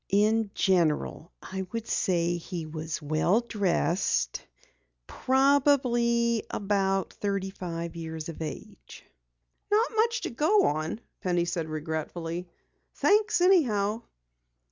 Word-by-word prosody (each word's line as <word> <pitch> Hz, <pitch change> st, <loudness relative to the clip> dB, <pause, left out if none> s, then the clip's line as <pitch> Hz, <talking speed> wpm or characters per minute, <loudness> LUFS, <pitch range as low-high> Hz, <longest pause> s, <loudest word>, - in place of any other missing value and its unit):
"In 215 Hz, +2 st, +2 dB
general 170 Hz, -2 st, +1 dB
I 190 Hz, 0 st, -4 dB
should 230 Hz, -1 st, -4 dB
say 175 Hz, -1 st, +1 dB
he 170 Hz, -1 st, -6 dB
was 155 Hz, 0 st, -5 dB
well 155 Hz, +8 st, +2 dB
dressed 195 Hz, -5 st, 0 dB, 0.6 s
probably 250 Hz, -, +2 dB
about 195 Hz, -1 st, 0 dB
thirty 195 Hz, -1 st, -2 dB
five 170 Hz, -2 st, -5 dB
years 160 Hz, -1 st, -6 dB
of 165 Hz, -1 st, -8 dB
age." 140 Hz, -, -8 dB, 0.6 s
"Not 435 Hz, +3 st, +2 dB
much 465 Hz, +2 st, +2 dB
to -, -, -4 dB
go 320 Hz, -, +3 dB
on," 155 Hz, +8 st, -1 dB, 0.2 s
Penny 175 Hz, -2 st, +1 dB
said 170 Hz, -2 st, -3 dB
regretfully. 165 Hz, +3 st, -4 dB, 0.5 s
"Thanks 415 Hz, -3 st, +3 dB
anyhow." 230 Hz, -, +3 dB
195 Hz, 105 wpm, -28 LUFS, 165-235 Hz, 0.6 s, go